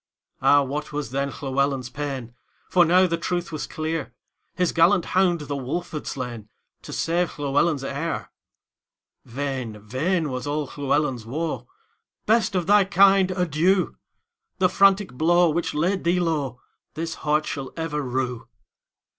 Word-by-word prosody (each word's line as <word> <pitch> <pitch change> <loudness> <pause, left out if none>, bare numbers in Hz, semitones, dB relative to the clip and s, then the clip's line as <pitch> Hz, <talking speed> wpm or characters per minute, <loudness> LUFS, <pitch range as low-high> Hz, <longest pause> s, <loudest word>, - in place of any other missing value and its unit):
Ah, 145 0 +5
what 145 +3 -4
was 145 -5 -4
then 140 +1 -1
Llewelyn's 135 -2 -1
pain! 135 -5 -5 0.4
For 180 - +6
now 180 +3 +5
the 170 -2 -1
truth 175 0 -2
was 155 - -4
clear; 155 -6 -4 0.4
His 180 -1 +1
gallant 175 +2 +4
hound 180 -3 +3
the 145 -1 -4
wolf 140 +7 -4
had 150 - -5
slainTo 120 -5 -5 0.4
save 170 +1 -1
Llewelyn's 145 +1 +1
heir:Vain, 135 -4 -7
vain 150 - -1
was 130 +2 -4
all 150 +1 -1
Llewelyn's 140 -4 0
woe;"Best 220 - -3
of 180 -2 +1
thy 205 +2 +6
kind, 195 0 +5
adieu! 180 +1 +1 0.6
The 185 -1 +3
frantic 195 0 +3
blow 170 +4 +3
which 170 0 -2
laid 180 +6 0
thee 175 +2 +2
lowThis 160 0 -4
heart 150 0 +1
shall 135 -2 -5
ever 160 -2 -2
rue." 125 -2 -3
155 Hz, 130 wpm, -24 LUFS, 135-175 Hz, 0.6 s, For